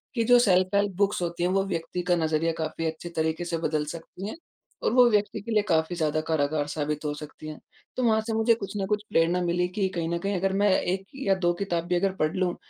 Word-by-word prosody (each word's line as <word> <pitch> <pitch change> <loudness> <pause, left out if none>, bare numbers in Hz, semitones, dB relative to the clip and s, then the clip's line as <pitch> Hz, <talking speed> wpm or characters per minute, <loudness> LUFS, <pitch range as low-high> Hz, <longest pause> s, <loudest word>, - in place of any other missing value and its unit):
कि 230 - +2
जो 245 +1 +6
self 185 -4 +3
help 200 0 +2
books 200 -2 +1
होती 170 0 -2
हैं 180 - +2
वो 195 0 +2
व्यक्ति 170 0 -3
का 180 0 +2
नज़रिया 160 0 +1
काफ़ी 160 +1 -3
अच्छे 160 +2 -4
तरीके 160 +2 -1
से 170 -1 -2
बदल 155 -2 -1
सकती 170 +5 -7
हैं। - - -6 0.5
और - - +1
वो 250 0 +7
व्यक्ति 205 -2 0
के 230 - -6
लिए 215 - +4
काफ़ी 160 +1 +2
ज़्यादा 155 -1 0
कारागर 145 -1 0
साबित 150 0 -3
हो 145 - -1
सकती 150 +1 -10
हैं। 155 - -7 0.4
तो 255 - 0
वहाँ 220 -2 +3
से 225 - -1
मुझे 225 +1 +4
कुछ 200 -3 -7
न 195 - -1
कुछ 210 0 0
प्रेरणा 170 +2 +2
मिली 175 +1 +1
कि 195 -3 +1
कहीं 165 -1 -1
न 170 - 0
कहीं 200 +2 -2
अगर 190 +1 0
मैं 205 - +5
1 190 +2 -2 0.2
या 195 -1 +4
2 175 - +4
किताब 170 -4 -1
भी 180 - +1
अगर 190 +1 +1
पढ़ 155 -1 0
लूँ, 185 -2 0
175 Hz, 250 wpm, -26 LUFS, 160-195 Hz, 0.5 s, वो